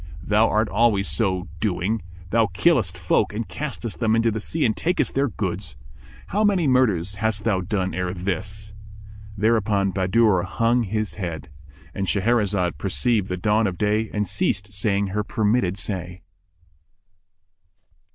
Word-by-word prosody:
Thou 105 +3 +3
art 110 +1 +2
always 105 -1 +2
so 95 -4 0
doing; 105 +1 -1 0.3
thou 115 -1 +3
killest 95 - +2
folk 90 +3 +1
and 115 +1 -3
castest 120 - -5
them 110 -1 +2
into 115 0 +2
the 110 - -3
sea 155 +8 -1
and 110 - +1
takest 175 +2 0
their 140 +1 +2
goods. 85 - -4 0.5
How 210 +2 +1
many 195 -5 +3
murders 105 - +2
hast 110 -2 0
thou 105 -5 +1
done 95 0 -2
ere 90 -1 -2
this?" 100 +3 -4 0.6
Thereupon 105 -2 +2
Bahadur 95 +1 +3
hung 115 +7 +1
his 110 +1 -2
head.—And 75 0 -7
Shahrazad 100 -4 +1
perceived 105 +1 0
the 90 - -2
dawn 105 +4 +2
of 90 -2 -4
day 105 +2 +1
and 105 -1 -1
ceased 100 +1 -1
saying 100 0 0
her 105 +2 -1
permitted 105 -3 0
say. 90 -3 -4
105 Hz, 140 wpm, -23 LUFS, 95-115 Hz, 0.6 s, Thou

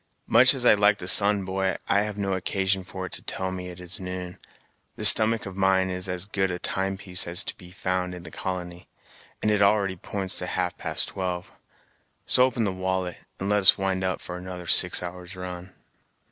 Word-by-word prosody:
Much 130 +4 +5
as 125 -2 +2
I - - +8
like 105 0 +3
the 90 - -7
sun, 100 0 +6
boy, 95 0 -1
I've 105 +1 0
no 100 -1 -1
occasion 95 +1 -1
for 95 0 -7
it 95 - -9
to - - -7
tell 95 0 -4
me 90 -1 -6
it 90 0 -11
is 90 +3 -4
noon; 90 -1 -7 0.6
this - - +9
stomach 110 0 +3
of 95 -1 -8
mine 95 -1 +2
is 90 0 0
as 90 0 -2
good 95 -2 -1
a 90 - -3
time 95 +2 -2
piece 90 -3 +1
as 85 +1 -3
is - - +3
to - - -6
be 90 - -14
found 90 0 -3
in 90 - -10
the - - -10
colony, 90 -2 -6 0.6
and 105 - +2
it 105 -1 +1
already 100 -2 +2
p'ints 95 +1 -5
to 90 - -4
half 90 0 -2
past - - -3
twelve. 90 -1 -5 0.7
So 125 - +4
open 120 -3 -1
the 100 - 0
wallet, 95 -1 -3 0.2
and 95 - -3
let 105 0 +2
us 95 - +7
wind 95 -1 -1
up 95 0 -2
for 90 - -7
another 90 -1 -8
six 85 - +3
hours' 90 +1 -8
run." 90 0 -8
95 Hz, 215 wpm, -25 LUFS, 90-100 Hz, 0.7 s, this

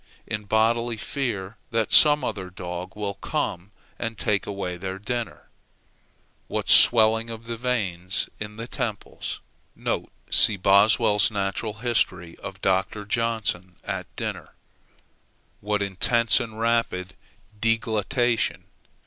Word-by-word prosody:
in 105 0 -5
bodily 115 +2 +1
fear 110 -5 -4
that 115 -2 -1
some 150 -2 +8
other 95 -6 -4
dog 90 0 -7
will 105 -1 -3
come 95 -1 -4 0.3
and 115 -2 -4
take 100 -2 0
their 95 -1 -5
dinner 120 +3 -3
away. - - -21 1.1
What - - -3
swelling 115 0 +6
of 115 0 -8
the 115 0 -4
veins 100 -7 -2
in 105 0 -7
the 115 +1 -7
temples! 110 -4 -5 0.9
(see 105 - +8
Boswell's 100 +2 +4
natural 100 +1 -3
history 90 -8 0
of - - -9
Dr. 95 +2 0
Johnson 110 -5 -2
at - - -4
dinner;) - - -6 1.0
what 105 0 -1
intense 110 +5 +3
and 110 -3 -6
rapid 115 -6 0 0.5
deglutition! 115 +2 0
105 Hz, 115 wpm, -24 LUFS, 95-115 Hz, 1.1 s, some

